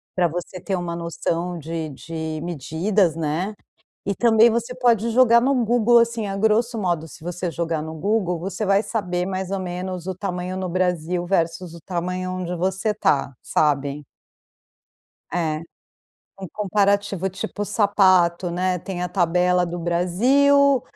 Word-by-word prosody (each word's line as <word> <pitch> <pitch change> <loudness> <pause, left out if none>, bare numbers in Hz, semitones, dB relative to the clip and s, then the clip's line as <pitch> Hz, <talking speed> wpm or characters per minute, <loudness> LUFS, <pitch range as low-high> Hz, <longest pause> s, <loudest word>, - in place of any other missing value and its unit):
pra 180 -2 +3
você 175 +2 -6
ter 190 +2 -2
uma 170 -1 -4
noção 170 +1 -3
de 160 0 -4
de 160 +2 -5
medidas, 170 +3 0
né, 165 +6 -2 0.5
e 200 - 0
também 230 +1 +5
você 235 +2 -2
pode 235 -3 +2
jogar 235 -1 +5
no 275 +3 +2
Google, 235 +1 +4
assim, 230 -2 +1
a 195 - -3
grosso 220 +3 +1
modo, 175 -5 -1
se - - -13
você 175 0 -3
jogar 165 -2 -2
no 160 0 -6
Google, 180 0 0
você 190 +4 -4
vai 200 +2 +3
saber, 180 -6 -2
mais 190 -1 -3
ou 195 -1 -2
menos, 180 0 -5
o 190 - -3
tamanho 180 -1 -4
no 185 -1 -3
Brasil 175 -1 -1
versus 170 -1 -1
o 170 - -11
tamanho 180 0 -3
onde 180 -1 -3
você 190 +4 -1
está, 145 -10 +1
sabe. 145 -1 0 1.3
É. 160 -3 -1 0.8
Um 190 - -5
comparativo, 200 -2 +1
tipo 205 +2 -5
sapato, 190 -4 +3
né, 180 +1 0
tem 180 +1 -6
a 180 - -1
tabela 180 0 +2
do 175 0 -5
Brasil, 255 +11 +3
185 Hz, 150 wpm, -22 LUFS, 170-205 Hz, 1.3 s, também